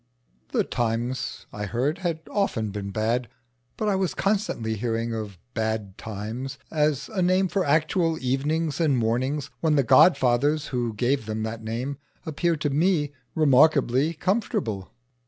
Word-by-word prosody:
The -, -, +2 dB
times, 120 Hz, +1 st, -2 dB
I 105 Hz, 0 st, -4 dB
heard, 130 Hz, -, -1 dB
had 170 Hz, -4 st, -2 dB
often 115 Hz, -, 0 dB
been 100 Hz, -1 st, -4 dB
bad; 115 Hz, +4 st, 0 dB, 0.5 s
but 215 Hz, -, -1 dB
I 205 Hz, -, +2 dB
was 190 Hz, -2 st, 0 dB
constantly 195 Hz, -, 0 dB
hearing 115 Hz, +1 st, -2 dB
of 105 Hz, -4 st, -5 dB, 0.2 s
"bad 110 Hz, -4 st, -2 dB
times" 110 Hz, +7 st, -5 dB
as 150 Hz, -3 st, +1 dB
a 200 Hz, -4 st, -2 dB
name 185 Hz, +2 st, +3 dB
for 190 Hz, +1 st, 0 dB
actual 160 Hz, +2 st, +2 dB
evenings 145 Hz, +4 st, 0 dB
and 145 Hz, -5 st, +3 dB
mornings 130 Hz, +6 st, 0 dB
when 160 Hz, -2 st, +2 dB
the 140 Hz, -, +4 dB
godfathers 140 Hz, +2 st, +4 dB
who 120 Hz, -4 st, -2 dB
gave 125 Hz, +1 st, 0 dB
them 110 Hz, 0 st, -2 dB
that 110 Hz, 0 st, -4 dB
name 120 Hz, +5 st, -3 dB, 0.3 s
appeared 160 Hz, +1 st, 0 dB
to 145 Hz, -, 0 dB
me 150 Hz, -1 st, +2 dB, 0.2 s
remarkably 145 Hz, 0 st, +4 dB
comfortable. 150 Hz, -, -1 dB
135 Hz, 145 wpm, -25 LUFS, 115-160 Hz, 0.5 s, the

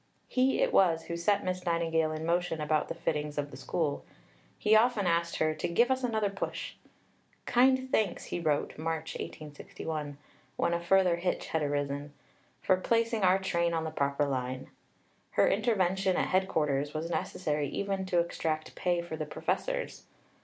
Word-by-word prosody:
He 260 Hz, -, +2 dB
it -, -, 0 dB
was 165 Hz, -4 st, +4 dB
who 170 Hz, -, -5 dB
set 200 Hz, +4 st, +1 dB
Miss 185 Hz, 0 st, -2 dB
Nightingale 165 Hz, -2 st, +1 dB
in 155 Hz, +1 st, -4 dB
motion 170 Hz, -1 st, 0 dB
about 150 Hz, 0 st, +1 dB
the -, -, -4 dB
fittings 150 Hz, -1 st, -2 dB
of 145 Hz, -1 st, -2 dB
the -, -, -9 dB
School. 155 Hz, -4 st, -2 dB, 0.5 s
He 215 Hz, 0 st, +4 dB
often 220 Hz, -2 st, +4 dB
asked 170 Hz, -1 st, +1 dB
her 155 Hz, 0 st, +1 dB
to 155 Hz, -, -3 dB
"give 235 Hz, +9 st, +3 dB
us 260 Hz, 0 st, 0 dB
another 220 Hz, -4 st, 0 dB
push." 195 Hz, -, -4 dB, 0.7 s
"Kind 260 Hz, +1 st, +3 dB
thanks," 210 Hz, -5 st, +1 dB
he -, -, -3 dB
wrote 155 Hz, -3 st, -1 dB
(March 160 Hz, 0 st, -3 dB
1861) 150 Hz, 0 st, -6 dB, 0.4 s
when 170 Hz, -, +1 dB
a 170 Hz, -, +1 dB
further 180 Hz, 0 st, +3 dB
hitch 180 Hz, +1 st, -1 dB
had 160 Hz, -, 0 dB
arisen, 145 Hz, 0 st, -2 dB, 0.5 s
"for 185 Hz, -, +4 dB
placing 230 Hz, +3 st, +1 dB
our 185 Hz, 0 st, +5 dB
train 170 Hz, -3 st, 0 dB
on 160 Hz, -, -1 dB
the 160 Hz, -, -3 dB
proper 140 Hz, -1 st, 0 dB
line." 130 Hz, -1 st, -3 dB, 0.6 s
Her -, -, +4 dB
intervention 195 Hz, -4 st, +2 dB
at -, -, +1 dB
headquarters 150 Hz, -6 st, +1 dB
was 165 Hz, +2 st, -3 dB
necessary 150 Hz, -6 st, -1 dB
even 195 Hz, +3 st, -2 dB
to 180 Hz, -2 st, +1 dB
extract 160 Hz, -2 st, -3 dB
pay 175 Hz, -1 st, 0 dB
for 170 Hz, -2 st, -5 dB
the 155 Hz, -1 st, -4 dB
professors. -, -, -3 dB
170 Hz, 165 wpm, -30 LUFS, 155-195 Hz, 0.7 s, our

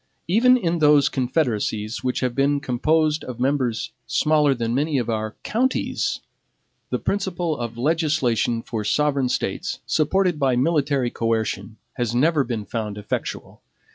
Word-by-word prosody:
Even 245 Hz, +8 st, +5 dB
in 170 Hz, -7 st, -1 dB
those 150 Hz, -2 st, +5 dB
confederacies 120 Hz, -5 st, -1 dB
which 125 Hz, -1 st, -1 dB
have 125 Hz, -2 st, 0 dB
been 140 Hz, +2 st, +2 dB
composed 150 Hz, +4 st, +1 dB
of 125 Hz, -2 st, -7 dB
members 130 Hz, -3 st, 0 dB, 0.2 s
smaller 150 Hz, -3 st, +3 dB
than 115 Hz, -1 st, -2 dB
many 145 Hz, +3 st, +1 dB
of 120 Hz, -2 st, -1 dB
our 110 Hz, -1 st, -3 dB
counties, 255 Hz, +4 st, -1 dB, 0.7 s
the -, -, 0 dB
principle 175 Hz, -5 st, -1 dB
of 120 Hz, -3 st, -5 dB
legislation 130 Hz, -6 st, +1 dB
for 110 Hz, -2 st, -4 dB
sovereign 140 Hz, +3 st, +1 dB
States, -, -, -2 dB
supported 180 Hz, +1 st, +1 dB
by 135 Hz, -3 st, +2 dB
military 140 Hz, -2 st, +1 dB
coercion, 110 Hz, -2 st, -2 dB, 0.2 s
has 120 Hz, -2 st, -1 dB
never 150 Hz, +3 st, +3 dB
been 115 Hz, -4 st, -4 dB
found 105 Hz, -3 st, -4 dB
effectual. 105 Hz, 0 st, -5 dB
135 Hz, 140 wpm, -23 LUFS, 115-155 Hz, 0.7 s, Even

